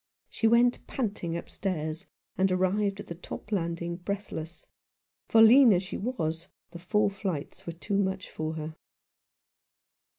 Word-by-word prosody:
She 225 - +1
went 240 +2 +3
panting 200 -9 -2
upstairs, 170 -1 -4 0.3
and 190 0 +2
arrived 195 +2 +1
at - - -6
the - - -6
top 180 +4 -9
landing 170 -2 -2
breathless; 175 -3 -5 0.6
for, 225 0 +6
lean 245 +2 +8
as 180 +1 +1
she 185 - -5
was, 165 -8 -3 0.2
the 170 - -9
four 205 +3 +1
flights 190 -8 -5
were 170 - -3
too 195 +4 -2
much 190 -1 -1
for 155 0 -4
her. 155 0 -5
185 Hz, 140 wpm, -28 LUFS, 170-205 Hz, 0.6 s, lean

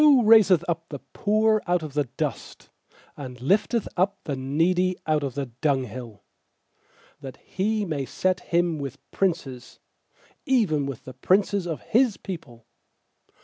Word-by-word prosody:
raiseth 210 -6 +6
up 165 -1 -3
the 145 - -5 0.2
poor 215 +1 +2
out 175 -1 +1
of 150 -3 -7
the 145 0 +1
dust, - - -5 0.4
And 125 -4 -8
lifteth 205 - +1
up 195 +3 +1
the 145 - -3
needy 170 +8 +1
out 155 -1 +1
of 135 -3 -4
the 140 -1 -2
dunghill; 125 -4 -3 1.0
8That 135 -3 -8
He 210 +2 -2
may 150 -6 -2
set 185 -1 0
him 170 -2 0
with 140 -1 -5
princes, 155 -10 -2 0.6
Even 205 - +1
with 135 -4 -7
the 130 - -8
princes 190 +6 +1
of 160 -3 -4
His 240 -2 +2
people. 120 - -9
165 Hz, 140 wpm, -25 LUFS, 135-195 Hz, 1.0 s, raiseth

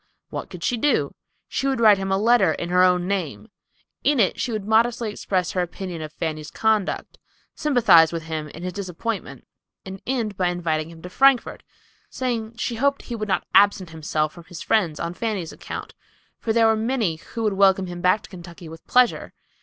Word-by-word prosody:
What - - -5
could - - -9
she 245 - 0
do? 290 +6 +1 0.3
She 275 - -2
would 265 -3 0
write 215 -3 +6
him 195 0 -3
a 195 - +3
letter 235 +4 +4
in 170 - -5
her 180 +1 +3
own 180 -1 +3
name. 195 +2 -3 0.5
In 290 -2 +2
it 195 - +2
she 245 - -2
would 215 -3 -3
modestly 230 0 +2
express 185 -3 -2
her 185 - 0
opinion 175 -1 -5
of 155 -1 -6
Fanny's 155 -1 -4
conduct; 220 -3 -1 0.3
sympathize 230 - +5
with 165 -1 -4
him 155 -1 -4
in 165 +4 -10
his 180 0 -4
disappointment, 200 +3 -5 0.4
and 190 0 -8
end 235 -5 -1
by 180 -1 0
inviting 165 -3 -1
him 165 -1 -13
to 180 - -7
Frankfort, 270 +2 +3 0.5
saying 235 -3 -3
she 235 -1 -3
hoped 280 +3 +1
he 240 - -6
would 215 -1 -4
not - - 0
absent 200 -3 +4
himself 155 -1 -2
from 170 -2 -13
his 175 -3 -9
friends 175 -9 +1
on 170 0 -3
Fanny's 200 -5 -3
account; - - -7 0.5
for 225 - -2
there 230 0 +4
were 220 0 +4
many 220 -7 -1
who 225 +7 -7
would 210 -2 +1
welcome 195 -1 +4
him 175 -1 -7
back 185 +4 +2
to - - -13
Kentucky 175 -2 -11
with 160 +1 -11
pleasure. 250 -1 +2
195 Hz, 200 wpm, -23 LUFS, 170-225 Hz, 0.5 s, write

